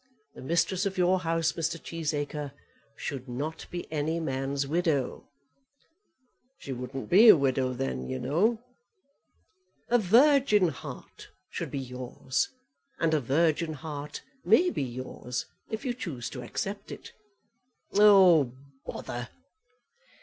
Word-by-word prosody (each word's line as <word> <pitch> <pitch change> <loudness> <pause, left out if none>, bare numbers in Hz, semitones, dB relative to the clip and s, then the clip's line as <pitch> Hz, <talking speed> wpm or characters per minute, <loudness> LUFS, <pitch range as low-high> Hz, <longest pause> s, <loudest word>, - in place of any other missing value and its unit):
The - - -11
mistress 170 +6 +1
of 195 - -5
your 185 +1 +3
house, 165 -2 0
Mr. 165 +1 -2
Cheesacre, 150 -3 -3 0.4
should 135 -2 -6
not 145 +6 -4
be 175 0 -5
any 160 +2 -1
man's 135 -2 -2
widow." 155 -3 -1 1.3
"She 135 - -6
wouldn't 125 +2 -6
be 215 +6 +8
a 205 - +10
widow 130 -2 +1
then, 65 - -3
you 130 - -2
know." 180 - +1 1.3
"A 245 - +4
virgin 230 - +5
heart - - -10 0.2
should - - -4
be - - -4
yours; 125 0 -3 0.5
and 165 -1 +2
a 155 - +3
virgin 155 +4 +1
heart 150 0 -7 0.2
may 335 - +4
be - - -2
yours, 125 -1 -5 0.2
if 220 +3 -5
you 250 - 0
choose 150 - -5
to 125 - -6
accept 195 - -5
it." - - -9 0.8
"Oh, 185 -10 +6 0.3
bother!" 120 +1 -6
155 Hz, 125 wpm, -28 LUFS, 130-185 Hz, 1.3 s, a